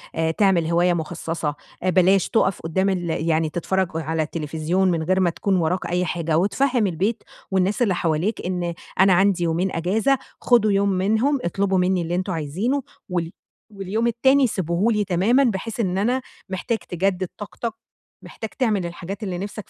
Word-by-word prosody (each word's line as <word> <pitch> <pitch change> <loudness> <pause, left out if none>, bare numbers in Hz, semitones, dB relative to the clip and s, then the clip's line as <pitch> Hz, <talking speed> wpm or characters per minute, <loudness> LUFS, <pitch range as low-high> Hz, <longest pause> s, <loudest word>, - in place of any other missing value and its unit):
آآ، 160 0 +1
تعمل 185 -3 +2
هواية 175 +2 +3
مخصّصة 165 -2 -3 0.3
آآ، 185 - +2
بلاش 185 +1 +4
تقف 195 -4 +1
قدام 190 +4 0
ال 180 -3 -1 0.2
يعني 160 0 +2
تتفرّج 190 +3 0
على 160 0 -1
التليفزيون 160 +4 -1
من 165 -2 -1
غير 185 +3 +1
ما 185 -2 +3
تكون 190 +3 -1
وراك 180 +1 0
أي 180 +1 0
حاجة، 165 -2 -1
وتفهّم 225 +4 +2
البيت 200 +6 -1 0.3
والناس 190 +4 +1
اللي 200 -6 +3
حواليك 170 +6 0
إن 175 -1 -2 0.3
أنا 190 0 +6
عندي 190 -1 +3
يومين 170 +3 0
أجازة، 215 +11 +2 0.2
خدوا 230 -4 +4
يوم 200 0 +2
منهم، 220 +9 +1
اطلبوا 195 +2 0
منّي 180 0 +2
اللي 170 +1 -2
أنتم 185 +1 -2
عايزينه، 185 - -1 0.3
والي 175 -1 -2 0.4
واليوم 205 +3 -2
التاني 265 +3 +4
سيبوه 185 +1 0
لي 210 -1 +1
تمامًا، 200 +9 +3
بحيث 225 -1 -2
إن 190 -4 0
أنا 245 +6 +1 0.3
محتاج 195 +5 -2
تجدد 185 -1 -1
طاقتك، 220 +2 -5 0.5
محتاج 220 - -8
تعمل 215 -8 +1
الحاجات 185 +5 -6
اللي 185 -3 -3
نِفسك 200 +2 -6
185 Hz, 170 wpm, -22 LUFS, 170-210 Hz, 0.5 s, أنا